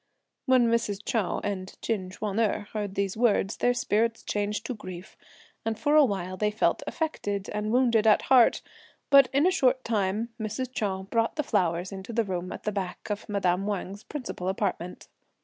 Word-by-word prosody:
When 255 Hz, -2 st, +5 dB
Mrs. 215 Hz, -3 st, 0 dB
Chou 220 Hz, -6 st, 0 dB
and 190 Hz, -2 st, -5 dB
Chin 195 Hz, -5 st, -1 dB
Ch'uan 205 Hz, +2 st, -3 dB
erh 215 Hz, -2 st, +1 dB
heard 205 Hz, -3 st, -3 dB
these 195 Hz, -1 st, -1 dB
words, 220 Hz, -3 st, +2 dB
their 245 Hz, 0 st, +2 dB
spirits 230 Hz, 0 st, 0 dB
changed 210 Hz, +2 st, -2 dB
to 250 Hz, -, -2 dB
grief, 185 Hz, -4 st, -9 dB, 0.5 s
and 225 Hz, -1 st, -2 dB
for 295 Hz, +4 st, +2 dB
a 305 Hz, -, +8 dB
while 185 Hz, -6 st, -2 dB
they 210 Hz, +1 st, +1 dB
felt 210 Hz, +1 st, +1 dB
affected 205 Hz, -, -3 dB
and 210 Hz, +1 st, -2 dB
wounded 235 Hz, -3 st, +3 dB
at 215 Hz, -, +5 dB
heart; 250 Hz, -3 st, +5 dB, 0.5 s
but 275 Hz, -2 st, +8 dB
in 280 Hz, +4 st, +3 dB
a 370 Hz, -, +5 dB
short 260 Hz, -6 st, +2 dB
time, 215 Hz, +1 st, 0 dB
Mrs. 220 Hz, +4 st, -4 dB
Chou 190 Hz, -5 st, -2 dB
brought 230 Hz, 0 st, +1 dB
the 300 Hz, -, 0 dB
flowers 175 Hz, -4 st, 0 dB
into 195 Hz, +4 st, -7 dB
the 230 Hz, 0 st, +2 dB
room 185 Hz, -3 st, -4 dB
at -, -, -7 dB
the 210 Hz, -, -1 dB
back 195 Hz, 0 st, -4 dB
of 210 Hz, +2 st, -4 dB
madame 195 Hz, -1 st, +1 dB
Wang's 200 Hz, 0 st, -4 dB
principal 240 Hz, -11 st, -5 dB
apartment. 190 Hz, -2 st, -3 dB
210 Hz, 185 wpm, -27 LUFS, 195-235 Hz, 0.5 s, a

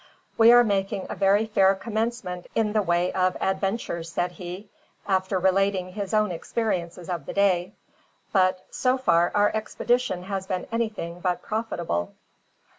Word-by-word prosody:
"We 225 Hz, +1 st, +7 dB
are 245 Hz, 0 st, +8 dB
making 195 Hz, -2 st, -1 dB
a -, -, -4 dB
very 200 Hz, +2 st, +3 dB
fair 195 Hz, -3 st, +3 dB
commencement 220 Hz, -3 st, -3 dB
in 215 Hz, -2 st, +1 dB
the 215 Hz, -, +3 dB
way 175 Hz, -1 st, +1 dB
of 185 Hz, 0 st, +1 dB
adventures," 190 Hz, -3 st, -2 dB
said 175 Hz, +1 st, -1 dB
he, 180 Hz, +3 st, -8 dB, 0.4 s
after 190 Hz, -1 st, +1 dB
relating 190 Hz, 0 st, +1 dB
his 200 Hz, -1 st, -4 dB
own 215 Hz, -3 st, +2 dB
experiences 175 Hz, -2 st, -3 dB
of 170 Hz, -6 st, -4 dB
the -, -, -4 dB
day, 190 Hz, -1 st, +2 dB, 0.6 s
"but 185 Hz, -2 st, +2 dB
so 255 Hz, 0 st, +1 dB
far 175 Hz, -9 st, +3 dB
our 205 Hz, 0 st, +4 dB
expedition 220 Hz, -3 st, -1 dB
has 190 Hz, 0 st, -4 dB
been 185 Hz, -1 st, -2 dB
anything 215 Hz, -7 st, -3 dB
but 180 Hz, -1 st, -1 dB
profitable." 170 Hz, -, -3 dB
195 Hz, 150 wpm, -25 LUFS, 180-215 Hz, 0.6 s, are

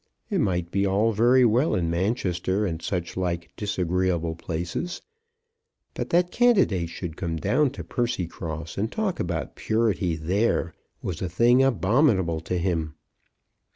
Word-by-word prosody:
It -, -, +1 dB
might 90 Hz, -3 st, -1 dB
be 100 Hz, -, +1 dB
all 100 Hz, +3 st, +2 dB
very 120 Hz, +4 st, +4 dB
well 120 Hz, +7 st, +3 dB
in 85 Hz, -2 st, 0 dB
Manchester 95 Hz, +1 st, 0 dB
and 80 Hz, -4 st, -3 dB
such 90 Hz, -2 st, -3 dB
like 85 Hz, -2 st, -2 dB
disagreeable 90 Hz, -4 st, 0 dB
places. 85 Hz, -, -4 dB, 0.9 s
But -, -, -4 dB
that 175 Hz, +1 st, +2 dB
candidates 195 Hz, -, +3 dB
should 85 Hz, -2 st, -6 dB
come 85 Hz, -1 st, -3 dB
down 145 Hz, -, +2 dB
to -, -, -7 dB
Percycross 85 Hz, -, -3 dB
and 110 Hz, +3 st, -1 dB
talk 215 Hz, -4 st, -2 dB
about 85 Hz, -1 st, -3 dB
purity 110 Hz, -6 st, 0 dB
there, 85 Hz, +2 st, 0 dB, 0.3 s
was 85 Hz, -5 st, -4 dB
a 90 Hz, -, -2 dB
thing 120 Hz, +8 st, +4 dB
abominable 105 Hz, -, +2 dB
to 90 Hz, +2 st, -3 dB
him. 85 Hz, -4 st, -1 dB
95 Hz, 140 wpm, -25 LUFS, 85-115 Hz, 0.9 s, very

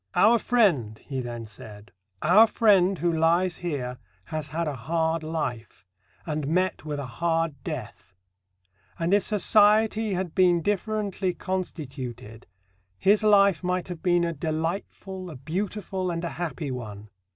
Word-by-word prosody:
"Our 230 Hz, +3 st, +5 dB
friend," 170 Hz, -, +2 dB
he 135 Hz, +2 st, -5 dB
then 120 Hz, -2 st, -6 dB
said: 105 Hz, -1 st, -11 dB, 0.3 s
Our 205 Hz, +8 st, +7 dB
friend 195 Hz, -4 st, +3 dB
who 170 Hz, 0 st, 0 dB
lies 170 Hz, +3 st, +2 dB
here 135 Hz, -8 st, -4 dB, 0.2 s
has 155 Hz, +6 st, -5 dB
had 160 Hz, +3 st, -2 dB
a 150 Hz, -, -2 dB
hard 160 Hz, +5 st, -1 dB
life, 150 Hz, -11 st, -5 dB, 0.4 s
and 150 Hz, -3 st, -3 dB
met 185 Hz, +3 st, 0 dB
with 150 Hz, -1 st, -4 dB
a 140 Hz, -, -4 dB
hard 165 Hz, +4 st, -1 dB
death; 130 Hz, -, -7 dB, 0.8 s
and, 170 Hz, +3 st, 0 dB
if 205 Hz, -, +5 dB
society 215 Hz, +1 st, +3 dB
had 180 Hz, -2 st, -3 dB
been 175 Hz, -3 st, +3 dB
differently 205 Hz, -2 st, -1 dB
constituted, 130 Hz, -, -5 dB, 0.5 s
his 205 Hz, -, +4 dB
life 200 Hz, -4 st, +4 dB
might 180 Hz, 0 st, -1 dB
have 175 Hz, -3 st, -6 dB
been 175 Hz, -1 st, +2 dB
a 170 Hz, 0 st, -1 dB
delightful, 170 Hz, +4 st, -4 dB
a 155 Hz, -, -8 dB
beautiful, 185 Hz, +5 st, -3 dB
and 170 Hz, 0 st, -3 dB
a 170 Hz, -, -2 dB
happy 165 Hz, -4 st, -4 dB
one. 105 Hz, -4 st, -7 dB
170 Hz, 140 wpm, -26 LUFS, 145-190 Hz, 0.8 s, Our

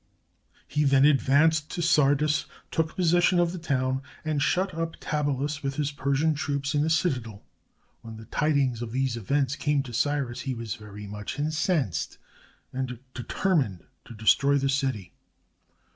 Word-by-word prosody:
He 150 Hz, 0 st, 0 dB
then 135 Hz, -1 st, +5 dB
ad 145 Hz, -2 st, +5 dB
vanced 150 Hz, +2 st, +3 dB
to 175 Hz, -, -4 dB
Sardis, 150 Hz, -1 st, +3 dB, 0.2 s
took 160 Hz, -1 st, -1 dB
possession 175 Hz, 0 st, +3 dB
of 175 Hz, -1 st, +2 dB
the 180 Hz, -, -6 dB
town, 130 Hz, -4 st, 0 dB, 0.2 s
and 155 Hz, -2 st, 0 dB
shut 185 Hz, +5 st, +1 dB
up 165 Hz, 0 st, -3 dB
Tabalus, 145 Hz, -1 st, -1 dB
with 135 Hz, -1 st, -3 dB
his 150 Hz, 0 st, -1 dB
Persian 140 Hz, +3 st, +1 dB
troops, 140 Hz, -1 st, -2 dB
in 145 Hz, -, +2 dB
the 155 Hz, -, +1 dB
citadel. 125 Hz, -, -1 dB, 0.6 s
When 115 Hz, -1 st, -9 dB
the 110 Hz, -, -11 dB
tidings 140 Hz, -3 st, +1 dB
of 120 Hz, -1 st, -5 dB
these 130 Hz, -2 st, 0 dB
events 135 Hz, +4 st, 0 dB
came 145 Hz, -1 st, 0 dB
to 125 Hz, -3 st, -9 dB
Cyrus, 130 Hz, 0 st, -1 dB
he 130 Hz, -2 st, -3 dB
was 115 Hz, -3 st, -4 dB
very 105 Hz, -2 st, -10 dB
much 105 Hz, +4 st, -6 dB
incensed, 155 Hz, -, -1 dB, 0.6 s
and 130 Hz, -1 st, -3 dB, 0.2 s
determined 130 Hz, -, -1 dB, 0.2 s
to 120 Hz, -, -11 dB
destroy 140 Hz, +6 st, +3 dB
the 135 Hz, 0 st, 0 dB
city. 135 Hz, -8 st, -1 dB
140 Hz, 160 wpm, -27 LUFS, 125-150 Hz, 0.6 s, then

